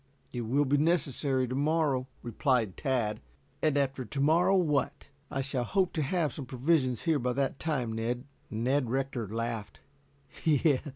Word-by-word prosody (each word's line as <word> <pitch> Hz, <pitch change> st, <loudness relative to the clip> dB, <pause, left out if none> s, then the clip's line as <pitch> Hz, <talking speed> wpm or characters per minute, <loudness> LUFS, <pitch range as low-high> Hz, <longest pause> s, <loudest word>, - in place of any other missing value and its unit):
"It 120 Hz, -, -2 dB
will 135 Hz, +6 st, +1 dB
be 140 Hz, +2 st, +2 dB
necessary 140 Hz, -4 st, +1 dB
to 125 Hz, -, -4 dB
morrow," 145 Hz, -2 st, +1 dB, 0.2 s
replied 120 Hz, -4 st, +1 dB
Tad. 120 Hz, -6 st, -1 dB, 0.4 s
"And 155 Hz, -2 st, +2 dB
after 135 Hz, -2 st, 0 dB
to 125 Hz, +4 st, -6 dB
morrow 170 Hz, +7 st, +4 dB
what?" 150 Hz, -7 st, 0 dB, 0.2 s
"I 135 Hz, -, -2 dB
shall 135 Hz, -2 st, -2 dB
hope 185 Hz, -, +1 dB
to 160 Hz, -, 0 dB
have 155 Hz, -1 st, 0 dB
some 140 Hz, -4 st, -7 dB
provisions 130 Hz, -1 st, +1 dB
here 160 Hz, -3 st, +2 dB
by 125 Hz, 0 st, 0 dB
that 135 Hz, +1 st, -1 dB
time, 130 Hz, -8 st, -1 dB
Ned." 120 Hz, +2 st, -2 dB, 0.3 s
Ned 125 Hz, +3 st, 0 dB
Rector 130 Hz, -3 st, -1 dB
laughed. 115 Hz, 0 st, -4 dB
135 Hz, 155 wpm, -30 LUFS, 120-150 Hz, 0.4 s, morrow